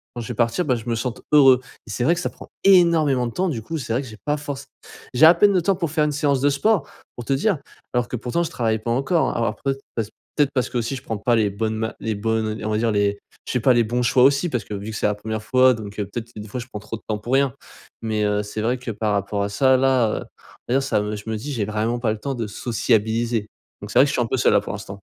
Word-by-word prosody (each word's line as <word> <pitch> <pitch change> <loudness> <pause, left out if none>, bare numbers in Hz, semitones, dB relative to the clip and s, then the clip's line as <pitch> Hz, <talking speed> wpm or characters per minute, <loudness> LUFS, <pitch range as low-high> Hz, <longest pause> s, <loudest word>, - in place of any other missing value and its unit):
quand 120 - -4
je 115 - -7
vais 120 - -2
partir 115 +9 +1
bah 130 - +2
je 115 -1 -7
me 115 - +1
sente 115 0 -4
heureux. 135 -4 +7 0.3
Et - - -11
c'est 120 - -2
vrai 170 - +5
que 175 - -3
ça - - -1
prend - - -13 0.2
énormément 165 -9 +5
de 115 - -6
temps, 185 0 0
du 115 -7 -3
coup, 165 +8 -4
c'est 115 -4 -3
vrai 125 - +1
que - - -9
j'ai 110 -2 -11
pas 150 0 +1
forcé 145 -1 -6 0.5
J'ai 145 - +7
à 165 - +9
peine 200 +3 +5
le 180 - +3
temps 195 +2 +2
pour 170 -3 -2
faire 155 -1 +2
une 150 - 0
séance 140 -2 +1
de 145 - +4
sport, 170 +3 +1 0.3
pour 120 - -7
te 135 - +1
dire, 185 +6 +1 0.4
alors 125 -1 +1
que 125 - -4
pourtant 125 +9 -1
je 165 - -3
travaille 110 -5 0
pas 115 +2 -3
encore 135 +7 +1
alors 115 0 0
peut-être 135 0 0 0.2
parce 110 -2 -2
que - - -36 0.2
peut-être 145 -1 +3
parce 125 -3 0
qu'aussi 120 +2 -2
je 130 - -8
prends 110 - -3
pas 120 +4 +2
les 110 -3 +2
bonnes 110 +2 -2
ma 110 0 -3
les 110 -2 -2
bonnes, 110 +1 0
on 110 - -4
di 110 - -8
on - - -1
va 105 - +1
dire, 115 0 +1
les 100 0 +1 0.3
je - - -3
sais 125 - +2
pas 130 +2 +4
les 120 -1 +4
bons 120 +3 -1
choix 125 +1 +4
aussi, 140 +5 +4
parce 125 -5 -2
que - - -7
vu 100 +2 -5
que 110 - -7
c'est - - -1
la 105 - 0
1re 110 +1 -5
fois 130 +2 +5
donc, 105 -1 -8
heu 100 - 0
peut-être, 115 +3 -6
des 105 0 -7
fois 125 +5 -5
je 120 - -10
prends 105 - -7
trop 110 +2 -6
de - - -20
temps 105 -1 -1
pour 120 +5 -4
rien. 135 -1 +3 0.5
Mais 110 -2 -1
heu, 105 0 +1
c'est 105 +1 -5
vrai 120 +3 0
que 125 -1 -5
par 105 0 -1
rapport 100 0 -1
à 100 - -2
ça, 130 +5 +3
là 130 -4 +3
heu - - -9 0.4
D'ailleurs 135 +3 +2
ça 120 -6 +1
me 105 +1 -3
je 105 +2 -8
me 110 - -1
dis: 140 +7 -6
«J'ai 110 -5 -1
vraiment 110 +3 -1
pas 115 -3 0
le 110 - -8
temps 135 +5 -3
de 115 -3 -3
sociabiliser.». 115 0 0 0.3
Donc 105 - -7
c'est - - +4
vrai 135 - +8
que - - -1
je - - -2
suis - - +1
un 115 - 0
peu 130 - -1
seul, - - +3
là - - +4
pour - - -6
l'instant. 100 0 -8
120 Hz, 315 wpm, -22 LUFS, 110-135 Hz, 0.5 s, à